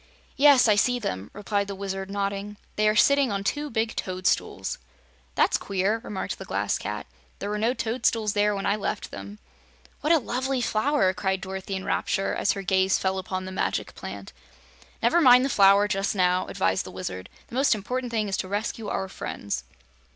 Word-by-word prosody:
"Yes, 280 -3 +6
I 215 - +6
see 245 +4 +3
them," 100 - -4
replied 205 0 -2
the 200 - -5
Wizard, 195 0 -4
nodding. 200 +1 -3 0.2
"They 215 0 +2
are 215 - +1
sitting 280 +1 +4
on 200 -1 -2
two 295 +8 -1
big 225 -1 -1
toadstools." 185 0 -1 0.6
"That's - - +3
queer," 200 +3 0
remarked 195 - -4
the - - -7
Glass - - -1
Cat. - - -4 0.3
"There 205 - -4
were 210 - -2
no 235 +4 +1
toadstools 225 -3 0
there 210 0 +2
when 195 - -3
I 200 - +2
left 215 - -3
them." 205 +1 -8 0.6
"What 300 - 0
a 335 - +7
lovely 260 0 -1
flower!" 220 -3 +2
cried 190 +1 -1
Dorothy 190 0 -5
in 190 - -5
rapture, 195 -1 0
as - - +1
her 195 - -5
gaze 190 0 +3
fell 190 0 -1
on 185 0 -2
the 190 - -6
Magic 190 - -2
Plant. - - -8 0.7
"Never 345 - +4
mind 250 -2 +7
the - - 0
Flower, 200 -2 +5
just 195 +1 -1
now," 180 -1 +2
advised 95 0 0
the - - -9
Wizard. 95 0 -6 0.2
"The - - -15
most 265 -1 +3
important 250 +5 -3
thing 220 -2 0
is 195 -1 -1
to - - -3
rescue 210 +2 -3
our 190 - -2
friends." 100 - -5
200 Hz, 190 wpm, -26 LUFS, 190-230 Hz, 0.7 s, a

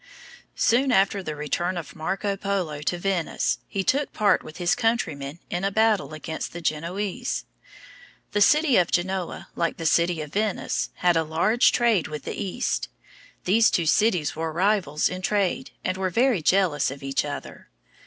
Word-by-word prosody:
Soon 255 +3 +3
after 195 -2 +3
the 155 -4 -5
return 175 +5 -2
of 165 - -7
Marco 195 +5 -2
Polo 185 -7 -2
to 175 +4 -1
Venice, 180 -2 -1
he 195 - -2
took 280 +9 +1
part 205 -3 +3
with 155 - -11
his 175 -1 +2
countrymen 165 - -1
in 175 +2 -2
a 195 - +2
battle 215 -6 +1
against 160 +1 -5
the 170 - -6
Genoese. 175 +5 -2 0.9
The 205 - 0
city 300 +4 +5
of 175 - +3
Genoa, 185 0 -2
like 170 -1 -1
the 165 - -5
city 170 +1 +2
of 150 0 -8
Venice, 210 -1 -1 0.2
had 175 -1 +5
a 165 - +3
large 180 +10 +3
trade 230 -8 +2
with 150 -2 -6
the - - -4
East. 205 +5 -2 0.5
These 220 +5 +4
two 170 - 0
cities 180 -3 +2
were 160 +1 -3
rivals 175 -4 +1
in 185 0 -5
trade, 205 +6 0
and 185 0 -1
were 190 -1 0
very 235 0 +2
jealous 160 -2 +2
of 135 +1 -8
each 135 0 0
other. 145 -1 -7
180 Hz, 170 wpm, -25 LUFS, 160-205 Hz, 0.9 s, city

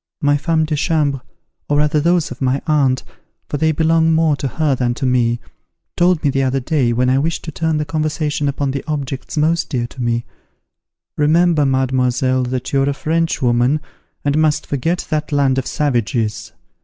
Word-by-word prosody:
My 145 0 +2
femmes 160 +2 +1
de 155 - -1
chambre, 145 -3 0 0.5
or 145 - +2
rather 150 +1 +2
those 170 0 +1
of 125 - -9
my 130 +1 +1
aunt, 140 -5 +2 0.4
for 145 - -3
they 160 +2 +2
belong 160 +1 +2
more 160 -2 +3
to 135 - -2
her 150 +3 0
than 120 -2 -1
to 135 - -3
me, 120 -2 +1 0.6
told 175 -2 +2
me 145 - +2
the 135 - 0
other 135 0 +1
day, 130 -3 0
when 125 +2 +1
I 130 +1 +3
wished 160 +3 -2
to 160 - -6
turn 160 0 -1
the 150 - -1
conversation 150 -1 -1
upon 140 0 -1
the 135 0 -4
objects 140 -2 -4
most 160 +3 +1
dear 125 -5 -1
to 125 +1 -9
me: 120 -1 -1 0.9
'Remember, 155 0 +3
mademoiselle, 130 -1 +1
that 125 +1 -4
you 135 - +3
are 135 - +1
a 140 - -2
French 165 -1 -1
woman, 125 +4 +2 0.5
and 145 +1 +2
must 155 -1 +1
forget 165 +6 -1
that 155 0 -1
land 135 -2 +2
of 130 - -4
savages.' 120 -6 -1
145 Hz, 190 wpm, -18 LUFS, 130-155 Hz, 0.9 s, more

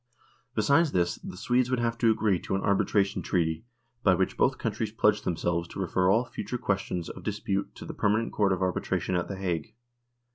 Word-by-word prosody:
Besides 140 +8 +3
this, 85 -1 +1
the - - -9
Swedes 125 +4 +1
would 130 - +1
have 115 0 0
to 115 - +4
agree 110 -4 +2
to - - -3
an 95 - -2
arbitration 100 0 +2
treaty, 80 +1 -1 0.4
by 95 - +4
which 95 +1 0
both - - +2
countries 110 -2 -2
pledged 105 -1 +2
themselves 85 0 -1
to - - -8
refer 90 0 +1
all 115 +6 +3
future 120 +1 -5
questions 95 -5 -2
of - - -8
dispute 105 -2 -2
to - - -9
the - - -6
permanent 105 +2 +1
Court 100 -2 +2
of 95 0 0
Arbitration 95 0 -1
at 90 -1 0
The 100 - -5
Hague. 90 -1 -3
100 Hz, 195 wpm, -28 LUFS, 90-110 Hz, 0.4 s, to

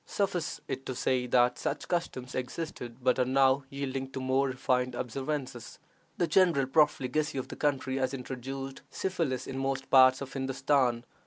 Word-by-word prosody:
Suffice 185 -5 -2
it 135 0 -4
to 130 - -3
say 125 0 0
that 125 0 +3
such - - -3
customs 130 -7 -2
existed, 125 -2 -5
but 130 +1 +3
are - - +5
now 135 +1 +3
yielding 135 -1 -4
to - - -3
more 130 +1 +1
refined 125 -1 0
observances. 130 0 -4 0.4
The 175 - +2
general 165 -4 +4
profligacy 145 0 +2
of 130 - -4
the - - -6
country 135 -2 0
has 130 -1 0
introduced 135 +1 -6
syphilis 165 -9 -2
in 135 0 -5
most 135 0 -2
parts 130 -1 +7
of 135 -1 -6
Hindostan. 130 -2 +1
135 Hz, 160 wpm, -30 LUFS, 130-140 Hz, 0.4 s, parts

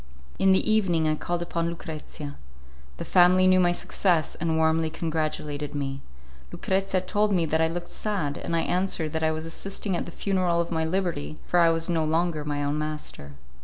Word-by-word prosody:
In 190 - +5
the 190 - +3
evening 185 -7 +3
I 155 - +3
called 175 +3 -2
upon 170 -1 -2
Lucrezia. 155 -3 -7 0.6
The - - -5
family 185 +1 +5
knew 185 0 +5
my 175 -1 +4
success, 175 -2 0
and 160 -1 -1
warmly 160 0 +2
congratulated 155 -2 -3
me. 135 -1 -3 0.5
Lucrezia 190 -1 0
told 205 +3 +1
me 175 -4 +2
that 160 +1 +1
I 160 - +4
looked 175 +1 -4
sad, 180 -10 -2
and 170 - -3
I 165 - +2
answered 180 -3 -1
that 160 - -1
I 160 - +3
was 160 0 -3
assisting 195 +3 -4
at - - -3
the - - -7
funeral 185 -2 0
of 170 0 -1
my 160 -1 0
liberty, 165 -4 -2
for 175 - +2
I 170 -1 +6
was 165 0 0
no 165 -2 +1
longer 160 0 0
my 145 -1 -2
own 145 +1 -1
master. 150 - -5
165 Hz, 195 wpm, -26 LUFS, 155-180 Hz, 0.6 s, I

